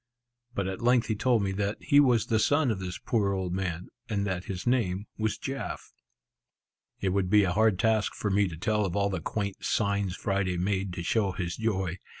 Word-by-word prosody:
But 100 Hz, -, -1 dB
at 95 Hz, 0 st, -4 dB
length 120 Hz, 0 st, +3 dB
he 110 Hz, -, +1 dB
told 115 Hz, 0 st, +2 dB
me 95 Hz, -, 0 dB
that 100 Hz, +2 st, -1 dB
he 145 Hz, 0 st, +4 dB
was 125 Hz, -6 st, +4 dB
the 110 Hz, -, +1 dB
son 145 Hz, +2 st, +3 dB
of 100 Hz, -, -2 dB
this 90 Hz, -1 st, -5 dB
poor 105 Hz, -5 st, 0 dB
old 95 Hz, -2 st, -2 dB
man, 90 Hz, -2 st, -3 dB, 0.2 s
and 100 Hz, -2 st, 0 dB
that 90 Hz, -2 st, -2 dB
his 95 Hz, -2 st, -5 dB
name 105 Hz, -6 st, +1 dB
was 110 Hz, -1 st, -1 dB
Jaf. 135 Hz, 0 st, -5 dB, 1.1 s
It 95 Hz, -, +1 dB
would 95 Hz, -1 st, 0 dB
be 105 Hz, +1 st, +6 dB
a 90 Hz, -, +1 dB
hard 110 Hz, -1 st, +3 dB
task 110 Hz, +2 st, +1 dB
for 105 Hz, -, -2 dB
me 100 Hz, +1 st, +3 dB
to 80 Hz, -3 st, -7 dB
tell 105 Hz, +3 st, +1 dB
of 95 Hz, -4 st, -2 dB
all 100 Hz, 0 st, +1 dB
the 95 Hz, -, -3 dB
quaint, 100 Hz, -2 st, -3 dB
signs 100 Hz, -3 st, 0 dB
Friday 95 Hz, -3 st, -1 dB
made 95 Hz, +1 st, -1 dB
to 85 Hz, -, -4 dB
show 100 Hz, +1 st, +1 dB
his 90 Hz, -2 st, -3 dB
joy. 95 Hz, -5 st, -1 dB
100 Hz, 210 wpm, -28 LUFS, 95-110 Hz, 1.1 s, be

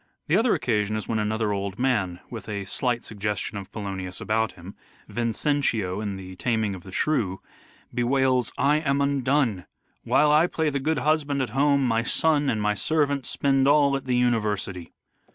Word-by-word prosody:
The 155 Hz, -, +2 dB
other 225 Hz, +3 st, +3 dB
occasion 110 Hz, -3 st, 0 dB
is 110 Hz, -, -4 dB
when 110 Hz, -2 st, 0 dB
another 110 Hz, 0 st, 0 dB
old 100 Hz, -1 st, -3 dB
man, 105 Hz, -9 st, 0 dB
with 115 Hz, -3 st, -7 dB
a 100 Hz, -2 st, -3 dB
slight 120 Hz, +4 st, -1 dB
suggestion 105 Hz, 0 st, -3 dB
of 95 Hz, -, -11 dB
Polonius 95 Hz, -3 st, -5 dB
about 110 Hz, 0 st, 0 dB
him, 90 Hz, +3 st, -11 dB, 0.3 s
Vincentio, 115 Hz, -5 st, -1 dB
in 100 Hz, -2 st, -3 dB
the 95 Hz, -1 st, -9 dB
" -, -, -25 dB
Taming 110 Hz, +1 st, 0 dB
of 95 Hz, -, -8 dB
the 95 Hz, -, -12 dB
Shrew," 100 Hz, -6 st, 0 dB, 0.5 s
bewails 130 Hz, +1 st, +1 dB
" -, -, -25 dB
I 150 Hz, -, +4 dB
am 140 Hz, -3 st, 0 dB
undone! 135 Hz, -7 st, +1 dB, 0.4 s
While 150 Hz, 0 st, +3 dB
I 155 Hz, +3 st, +5 dB
play 160 Hz, -3 st, -1 dB
the 140 Hz, -, -1 dB
good 155 Hz, +3 st, 0 dB
husband 145 Hz, 0 st, +1 dB
at 115 Hz, -, -5 dB
home 140 Hz, +1 st, +3 dB
my 115 Hz, -1 st, +2 dB
son 145 Hz, +3 st, +1 dB
and 110 Hz, -, 0 dB
my 105 Hz, 0 st, +1 dB
servant 145 Hz, +4 st, 0 dB
spend 135 Hz, -1 st, +2 dB
all 145 Hz, -1 st, +4 dB
at 135 Hz, -, -4 dB
the 125 Hz, -1 st, 0 dB
university." 105 Hz, -7 st, 0 dB
120 Hz, 185 wpm, -25 LUFS, 105-140 Hz, 0.5 s, I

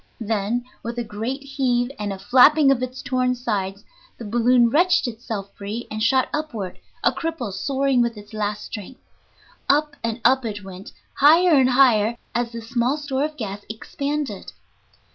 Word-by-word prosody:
Then, 225 Hz, +2 st, -1 dB, 0.2 s
with 235 Hz, +1 st, -6 dB
a 240 Hz, -, -1 dB
great 230 Hz, +6 st, -4 dB
heave 260 Hz, -3 st, 0 dB
and 205 Hz, -1 st, -2 dB
a 195 Hz, -, -5 dB
flapping 270 Hz, +8 st, +5 dB
of 260 Hz, -2 st, +1 dB
its 255 Hz, +1 st, -5 dB
torn 255 Hz, -1 st, 0 dB
sides, 205 Hz, -5 st, -3 dB, 0.3 s
the 235 Hz, -, -8 dB
balloon 240 Hz, +2 st, +3 dB
wrenched 355 Hz, +1 st, +3 dB
itself 220 Hz, -4 st, -6 dB
free 210 Hz, +4 st, -6 dB
and 215 Hz, 0 st, -4 dB
shot 260 Hz, +3 st, +3 dB
upward, 235 Hz, -12 st, -4 dB, 0.2 s
a -, -, +4 dB
cripple 320 Hz, -, -4 dB
soaring 270 Hz, +4 st, +1 dB
with 235 Hz, -2 st, -1 dB
its 205 Hz, +1 st, -13 dB
last 210 Hz, -1 st, -2 dB
strength. 215 Hz, +5 st, -8 dB, 0.7 s
Up 295 Hz, 0 st, +2 dB
and 230 Hz, +1 st, -2 dB
up 260 Hz, +2 st, +4 dB
it 205 Hz, -3 st, -5 dB
went, 190 Hz, +2 st, -10 dB, 0.3 s
higher 325 Hz, +5 st, +6 dB
and 265 Hz, -3 st, +5 dB
higher 235 Hz, -4 st, +4 dB, 0.2 s
as 235 Hz, 0 st, -1 dB
the 230 Hz, -1 st, -6 dB
small 240 Hz, +4 st, 0 dB
store 280 Hz, -2 st, -2 dB
of 305 Hz, 0 st, -7 dB
gas 205 Hz, -3 st, -5 dB
expanded. 280 Hz, +6 st, -4 dB
240 Hz, 165 wpm, -22 LUFS, 215-270 Hz, 0.7 s, higher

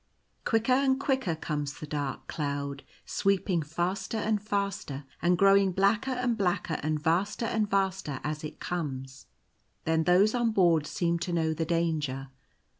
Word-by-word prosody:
Quicker 225 Hz, +2 st, +2 dB
and 265 Hz, 0 st, +3 dB
quicker 265 Hz, -, 0 dB
comes 150 Hz, -2 st, -3 dB
the -, -, -7 dB
dark 145 Hz, -2 st, -4 dB
cloud, 140 Hz, -2 st, -3 dB, 0.2 s
sweeping 195 Hz, -3 st, +1 dB
faster 175 Hz, +8 st, -2 dB
and 215 Hz, -1 st, 0 dB
faster, 200 Hz, -9 st, -2 dB, 0.2 s
and 175 Hz, +1 st, +3 dB
growing 195 Hz, 0 st, +5 dB
blacker 200 Hz, +7 st, +2 dB
and 250 Hz, -2 st, 0 dB
blacker 180 Hz, -3 st, 0 dB
and 155 Hz, 0 st, 0 dB
vaster 180 Hz, +9 st, 0 dB
and 220 Hz, -2 st, 0 dB
vaster 190 Hz, -8 st, 0 dB
as 150 Hz, +1 st, -3 dB
it 155 Hz, 0 st, -7 dB
comes. 135 Hz, -6 st, -5 dB, 0.6 s
Then 160 Hz, 0 st, +1 dB
those 190 Hz, +5 st, +5 dB
on 240 Hz, -2 st, +1 dB
board 170 Hz, -6 st, +3 dB
seem 170 Hz, -1 st, 0 dB
to 175 Hz, -, -3 dB
know 160 Hz, -2 st, +1 dB
the 160 Hz, +1 st, -2 dB
danger. 155 Hz, -5 st, -1 dB
175 Hz, 150 wpm, -29 LUFS, 150-200 Hz, 0.6 s, growing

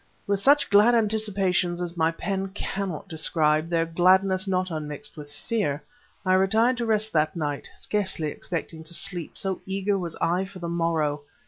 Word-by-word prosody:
With 200 Hz, -1 st, 0 dB
such 285 Hz, +2 st, +4 dB
glad 210 Hz, +4 st, +6 dB
anticipations 200 Hz, -5 st, +1 dB
as 175 Hz, -1 st, -4 dB
my 160 Hz, -1 st, +2 dB
pen 195 Hz, +3 st, -3 dB
cannot 195 Hz, -6 st, -4 dB
describe, 155 Hz, -1 st, +1 dB
their 165 Hz, -1 st, +2 dB
gladness 185 Hz, +3 st, +3 dB
not 185 Hz, -1 st, 0 dB
unmixed 155 Hz, +6 st, -5 dB
with 145 Hz, -2 st, -10 dB
fear, 145 Hz, -2 st, -2 dB, 0.4 s
I 185 Hz, -, +3 dB
retired 220 Hz, +6 st, +3 dB
to 235 Hz, -1 st, -2 dB
rest 215 Hz, 0 st, +1 dB
that 155 Hz, +1 st, +2 dB
night, 145 Hz, -4 st, -3 dB
scarcely 190 Hz, -7 st, -1 dB
expecting 160 Hz, +1 st, -5 dB
to 170 Hz, -, -3 dB
sleep, 175 Hz, -3 st, -3 dB
so 190 Hz, -2 st, -3 dB
eager 195 Hz, +1 st, 0 dB
was 170 Hz, -3 st, -4 dB
I 180 Hz, +3 st, +1 dB
for 190 Hz, 0 st, -11 dB
the 175 Hz, -2 st, -5 dB
morrow. 165 Hz, -3 st, 0 dB
185 Hz, 165 wpm, -25 LUFS, 165-200 Hz, 0.4 s, glad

